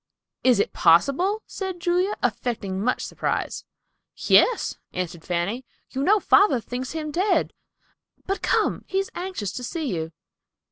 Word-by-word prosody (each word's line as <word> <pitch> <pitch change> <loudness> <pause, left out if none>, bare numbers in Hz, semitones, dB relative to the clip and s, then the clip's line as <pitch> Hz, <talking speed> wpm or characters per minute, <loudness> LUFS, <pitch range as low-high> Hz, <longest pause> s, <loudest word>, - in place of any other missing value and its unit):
"Is 250 -4 +4
it - - 0
possible?" 315 - +3
said 380 -3 -5
Julia, 360 +4 +1
affecting 210 -4 -1
much 250 +2 0
surprise. - - -3 0.5
"Yes," - - +3
answered 175 -2 -4
Fanny. 180 +8 -2 0.3
"You 265 - -3
know 415 +8 +4
father 400 - +4
thinks 250 +4 -5
him 310 -2 -4
dead. 375 +7 +1 0.7
But 390 +1 -2
come, - - +1
he 380 - -2
is 390 0 -1
anxious 350 - -4
to 250 - -6
see 300 - -3
you." 160 0 -4
270 Hz, 140 wpm, -24 LUFS, -, 0.7 s, Is